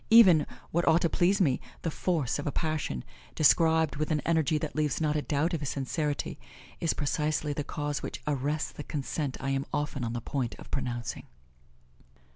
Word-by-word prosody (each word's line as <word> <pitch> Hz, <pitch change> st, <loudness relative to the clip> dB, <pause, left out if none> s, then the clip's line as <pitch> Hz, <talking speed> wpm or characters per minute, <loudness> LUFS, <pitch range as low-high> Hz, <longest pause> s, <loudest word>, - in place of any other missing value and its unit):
Even 190 Hz, -9 st, +8 dB, 0.2 s
what 170 Hz, +1 st, +1 dB
ought 165 Hz, +1 st, +5 dB
to 170 Hz, -, +2 dB
please 185 Hz, +4 st, +3 dB
me 140 Hz, -9 st, +2 dB, 0.2 s
the 165 Hz, -, 0 dB
force 150 Hz, -7 st, 0 dB
of 145 Hz, -, -3 dB
a -, -, +1 dB
passion, 155 Hz, -, -2 dB, 0.3 s
described 160 Hz, 0 st, +4 dB
with 155 Hz, +1 st, -1 dB
an 155 Hz, -2 st, +2 dB
energy 160 Hz, 0 st, +2 dB
that 150 Hz, 0 st, -4 dB
leaves 150 Hz, -3 st, +1 dB
not 155 Hz, -2 st, +1 dB
a 150 Hz, -, +1 dB
doubt 150 Hz, +4 st, 0 dB
of 165 Hz, -, 0 dB
his 145 Hz, -2 st, -3 dB
sincerity, 145 Hz, +2 st, -2 dB, 0.4 s
is 165 Hz, -, +1 dB
precisely 150 Hz, 0 st, 0 dB
the 145 Hz, -, -2 dB
cause 145 Hz, 0 st, -3 dB
which -, -, -5 dB
arrests 145 Hz, +1 st, -1 dB
the 150 Hz, -, -8 dB
consent 145 Hz, -1 st, -3 dB
I 135 Hz, +1 st, -2 dB
am 135 Hz, 0 st, -1 dB
often 145 Hz, -3 st, -2 dB
on 115 Hz, 0 st, -2 dB
the 120 Hz, -, -2 dB
point 125 Hz, -1 st, -2 dB
of -, -, -13 dB
pronouncing. 120 Hz, -4 st, -3 dB
150 Hz, 190 wpm, -29 LUFS, 140-160 Hz, 0.4 s, Even